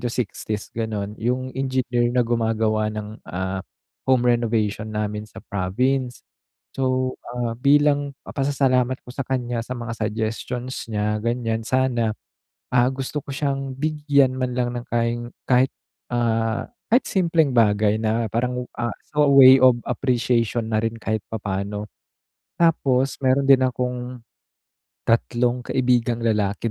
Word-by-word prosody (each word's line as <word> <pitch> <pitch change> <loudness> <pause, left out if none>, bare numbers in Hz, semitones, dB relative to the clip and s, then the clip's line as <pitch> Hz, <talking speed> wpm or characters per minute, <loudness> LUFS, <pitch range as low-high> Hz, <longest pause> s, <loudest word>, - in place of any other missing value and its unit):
to 120 - -1
60's 105 -3 -4
ganon 105 -2 -3
yung 125 +3 -1
engineer 130 -3 0
na 125 - +4
gumagawa 110 -2 +1
ng, 105 0 -6
ah, 95 +1 -3 0.5
home 130 -2 +3
renovation 110 -2 0
namin 105 0 -2
sa - - -11
province. 125 +7 -1 0.6
So, 130 -1 0 0.2
ah, 120 -2 -2
bilang 145 +1 +3
papasalamat 130 -2 +1
ko - - -17
sa 135 - -3
kanya 120 -3 -1
sa 125 - -6
mga 120 -1 -5
suggestions 110 +4 -3
niya 105 0 0
ganyan 115 -1 -1
sana, 125 -4 +1 0.6
ah, 125 0 +5
gusto 135 +2 -4
ko - - -31
siyang 135 -2 -2
bigyan 145 -3 +2
man 125 -1 -2
lang 125 -1 0
ng 120 - -6
kain 120 +1 -1 0.2
kahit, 130 +1 +4 0.4
ah, 115 -1 0 0.3
kahit 245 - +4
simpleng 165 -7 +2
bagay 105 -2 +3
na 110 +1 +1
parang, 125 +3 -2
ah, 120 0 -1 0.2
so 150 -1 +3
way 135 -1 +9
of 125 -2 +6
appreciation 120 -2 0
na 110 0 +1
rin 115 0 -1
kahit 110 -1 -2
papaano. 105 -1 -3 0.7
Tapos 135 -6 +2
meron 130 +2 +3
din 135 -1 +7
akong, 125 -1 -3 0.8
3 120 +2 +1
kaibigang 120 -2 +1
lalaki 105 0 0
120 Hz, 135 wpm, -23 LUFS, 110-130 Hz, 0.8 s, way